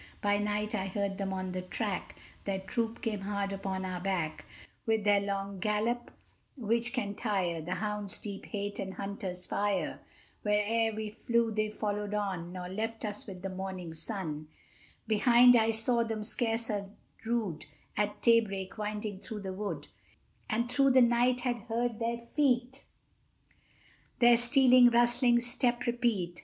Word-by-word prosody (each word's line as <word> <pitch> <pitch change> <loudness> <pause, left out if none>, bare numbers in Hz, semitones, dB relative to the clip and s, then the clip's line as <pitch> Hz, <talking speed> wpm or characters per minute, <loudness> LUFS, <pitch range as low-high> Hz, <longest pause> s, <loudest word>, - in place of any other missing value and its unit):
By 205 0 +2
night 210 +1 -1
I 195 -2 -1
heard 195 0 -2
them 195 -1 -2
on 185 -1 -3
the 185 0 -3
track, 195 +2 -4 0.3
Their 195 -1 -1
troop 225 +4 -3
came 215 -4 -1
hard 200 0 -2
upon 190 -1 -3
our 185 -1 -3
back, 175 -4 -2 0.4
With 220 -1 +2
their 205 -1 +5
long 200 -1 -3
gallop, 215 +5 0 0.5
which 235 0 0
can 210 -6 -2
tire 190 -7 -1
The 160 - -3
hound's 210 -2 -2
deep 200 -2 -7
hate 205 -1 -4
and 190 0 -4
hunter's 190 -2 -5
fire: 205 -1 -1 0.4
Where'er 220 +2 +2
we 215 -1 -4
flew 235 +1 +1
they 215 0 0
followed 210 -1 -2
on, 190 -5 -2
Nor 180 -1 -6
left 225 +4 -3
us 210 0 -5
with 190 -2 -8
the 195 - -3
morning 185 -3 -5
sun; 160 -4 -4 0.6
Behind 240 +3 +6
I 225 -1 +4
saw 225 +2 +2
them, 225 -2 -3
scarce 225 0 -1
a 200 -1 -3 0.3
rood, 220 -10 -2 0.3
At 210 0 -1
daybreak 215 -4 +2
winding 210 -1 -3
through 210 +1 -7
the 190 -1 -4
wood, 205 +1 -4 0.6
And 235 +2 0
through 275 +1 +3
the 260 -1 +7
night 240 +1 +3
had 245 -1 0
heard 235 0 -1
their 235 0 -1
feet 255 +1 0 1.3
Their 240 -1 +6
stealing, 250 0 +7
rustling 240 +1 +4
step 240 0 +1
repeat. 230 -8 0
210 Hz, 155 wpm, -31 LUFS, 195-235 Hz, 1.3 s, the